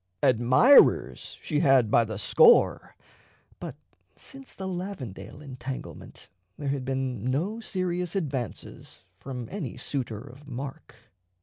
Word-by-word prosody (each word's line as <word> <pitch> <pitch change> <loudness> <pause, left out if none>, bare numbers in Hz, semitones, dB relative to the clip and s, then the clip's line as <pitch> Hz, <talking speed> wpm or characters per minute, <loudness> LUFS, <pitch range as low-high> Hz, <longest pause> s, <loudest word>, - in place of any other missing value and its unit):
Admirers 130 - +5
she 150 -3 0
had 135 -8 +4
by 120 - +5
the 110 -2 -5
score, 470 - +4 0.6
but - - -7 0.4
since 270 -1 -11
the 190 - -5
Lavendale 150 - -6
entanglement 130 -1 -8 0.3
there 145 - -3
had 135 -1 -2
been 130 -4 -2
no 160 - -1
serious 180 -4 -2
advances 135 - -5
from 125 -4 -6
any 170 - -5
suitor 120 -6 -3
of 140 +3 -14
mark. 135 +1 -7
135 Hz, 115 wpm, -27 LUFS, 125-180 Hz, 0.6 s, Admirers